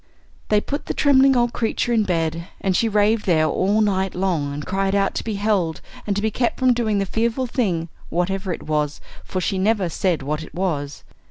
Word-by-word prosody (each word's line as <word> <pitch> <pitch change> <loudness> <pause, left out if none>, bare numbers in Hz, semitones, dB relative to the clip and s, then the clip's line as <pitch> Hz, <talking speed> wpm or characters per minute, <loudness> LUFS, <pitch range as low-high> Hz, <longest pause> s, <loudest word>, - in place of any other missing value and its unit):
They 210 - +4
put 285 +7 -5
the - - -2
trembling 270 -2 +5
old 240 -1 +2
creature 235 +1 0
in 220 -2 +3
bed, 165 -1 -1
and 190 -2 0
she 230 - +2
raved 210 +1 +2
there 160 -3 +4
all 195 +7 +1
the - - +4
night 190 -2 0
long 175 -6 0
and 145 +1 -5
cried 195 +1 0
out 195 -1 +1
to - - -3
be 220 -2 -3
held, 200 -6 0 0.3
and 200 - 0
to 205 - -2
be 220 - +1
kept 240 +2 0
from 255 -1 +4
doing 225 -3 0
the 195 - +1
fearful 230 +5 0
thing, 195 -10 -1 0.2
whatever 185 +3 -1
it - - -5
was 150 -1 -1 0.2
for 185 - -3
she 185 +1 -1
never 200 -2 +1
said 170 -2 0
what 150 +3 -2
it 160 - -11
was. 150 -6 -2
195 Hz, 220 wpm, -22 LUFS, 170-220 Hz, 0.3 s, trembling